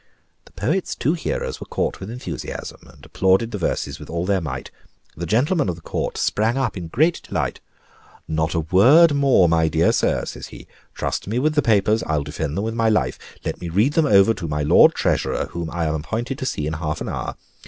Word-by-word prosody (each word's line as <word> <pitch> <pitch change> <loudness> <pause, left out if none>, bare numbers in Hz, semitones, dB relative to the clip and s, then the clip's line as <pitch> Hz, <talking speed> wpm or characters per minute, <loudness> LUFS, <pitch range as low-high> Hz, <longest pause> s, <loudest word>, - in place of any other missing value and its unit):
The - - -19
poet's 155 - -1
two 150 - +1
hearers 170 - -3
were - - -7
caught - - -2
with 95 - -7
enthusiasm, 125 +2 -7
and - - -17
applauded 95 +5 +2
the 105 - -4
verses 75 -3 -2
with 75 - -11
all 85 +1 -2
their 95 -1 +1
might. 80 - -5 0.4
The 85 +1 -5
gentleman 135 - +2
of 85 - -2
the 85 - -15
Court - - -3
sprang 110 +4 +1
up 135 -4 -1
in 90 -3 -6
great 155 - +1
delight. - - -3 0.7
"Not 80 0 -1
a 80 - +1
word 130 - +6
more, 135 -10 +4
my 80 -1 +3
dear 80 - +3
sir," - - +1
says - - -7
he. - - -12 0.3
"Trust - - -3
me 110 +4 -2
with 150 +4 +1
the 150 - +3
papers 110 -2 +2
I'll 75 -2 -1
defend 75 +2 -4
them 100 - -1
with 110 +1 -2
my 115 -1 +2
life. 65 - 0 0.3
Let - - -4
me 85 - -4
read 105 - +2
them 160 -1 +3
over 100 -1 +5
to 85 -6 -6
my 75 -1 -1
Lord 75 - +6
Treasurer, - - 0
whom 85 -1 -4
I 85 0 -2
am 75 - 0
appointed 115 - -3
to 130 - -3
see 75 -11 -2
in 80 - -2
half 75 -1 -3
an - - -4
hour. - - -4
95 Hz, 220 wpm, -22 LUFS, 80-120 Hz, 0.7 s, word